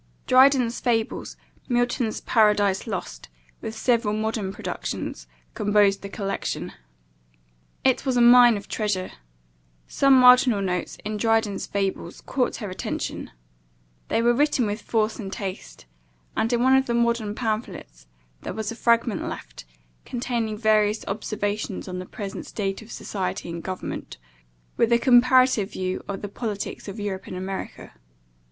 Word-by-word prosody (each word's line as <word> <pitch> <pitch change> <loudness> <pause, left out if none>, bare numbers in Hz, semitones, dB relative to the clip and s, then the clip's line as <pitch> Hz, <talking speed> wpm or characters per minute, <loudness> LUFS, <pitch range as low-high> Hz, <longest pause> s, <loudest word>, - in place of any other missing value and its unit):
Dryden's 255 -2 +4
Fables, 225 -3 -1 0.3
Milton's 245 -2 0
Paradise 210 -2 +2
Lost, 175 - -5 0.3
with 220 - -6
several 230 -4 +1
modern 215 -2 -2
productions, - - -5 0.3
composed 205 -1 +2
the 200 - -7
collection. 195 -1 -4 1.1
It 260 -1 +2
was 260 -2 0
a - - +4
mine 240 -1 +7
of 200 - -9
treasure. 205 -4 -2 0.8
Some 275 -1 +4
marginal 250 -3 +6
notes, 180 -3 -2
in 215 0 -2
Dryden's 225 -2 +1
Fables, 195 -3 -3
caught 255 -2 -1
her 210 -5 -6
attention: 185 - -4 0.8
they 230 - +1
were 240 0 +4
written 280 -2 +2
with 210 +1 -3
force 220 0 -1
and 195 -3 -6
taste; 190 - -7 0.5
and, 225 - 0
in 240 0 +2
one 260 +1 +5
of 265 0 +2
the 235 - 0
modern 235 -3 0
pamphlets, 215 - -4 0.3
there - - -6
was 220 0 -3
a - - -6
fragment 235 -1 +1
left, - - -9 0.4
containing 235 -3 -3
various 215 -1 +2
observations 205 -1 -3
on 180 -1 -5
the 185 - -7
present 200 -3 -7
state 195 -1 -3
of 220 - -13
society 185 -3 -4
and 170 0 -5
government, 185 - -6 0.6
with 230 - +2
a 235 - +6
comparative 255 -3 +4
view 185 0 -3
of 200 0 -5
the - - -2
politics 205 -1 -5
of 200 +2 -7
Europe 200 -2 -4
and - - -6
America. 190 - -6
215 Hz, 145 wpm, -24 LUFS, 195-240 Hz, 1.1 s, mine